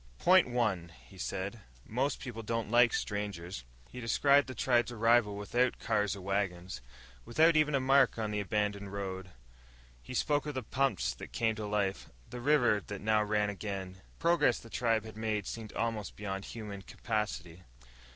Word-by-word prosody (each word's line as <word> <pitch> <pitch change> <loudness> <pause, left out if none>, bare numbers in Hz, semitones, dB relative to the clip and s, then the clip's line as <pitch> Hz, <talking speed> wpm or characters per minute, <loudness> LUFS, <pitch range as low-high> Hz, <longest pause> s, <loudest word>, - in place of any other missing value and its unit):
"Point 185 -6 +5
one," 105 -9 0
he - - -15
said, 100 +5 -3 0.3
"most 130 +5 -1
people 120 -4 -6
don't 115 -1 -3
like 120 0 +6
strangers." 100 - -3 0.3
He 125 - -8
described 140 +5 +4
the 130 - -7
tribe's 120 -1 +2
arrival 115 -2 +3
without 120 +5 +1
cars 105 -2 0
or 100 - -9
wagons, 95 -4 -2 0.4
without 160 - +4
even 150 -1 +3
a - - +3
mark 130 -2 +4
on 110 -2 -2
the 105 - -1
abandoned 100 0 -1
road. 95 -2 -4 0.7
He 125 - -8
spoke 145 +3 +1
of 150 - -4
the 130 - -2
pumps 105 - 0
that - - -10
came 115 -1 +1
to 110 -1 -5
life, 100 -2 -1 0.2
the 125 - -7
river 125 -6 +3
that 105 -1 -5
now 110 +1 +3
ran 105 0 +1
again. 100 -2 -5
The 95 - -19 0.2
progress 170 -8 +3
the 115 - -12
tribe 115 -3 +1
had 110 -1 -10
made 110 -2 -1
seemed 110 -2 -6
almost 115 -3 -2
beyond 95 -1 -4
human 105 -4 -7
capacity. 95 -6 -4
110 Hz, 170 wpm, -32 LUFS, 100-120 Hz, 0.7 s, like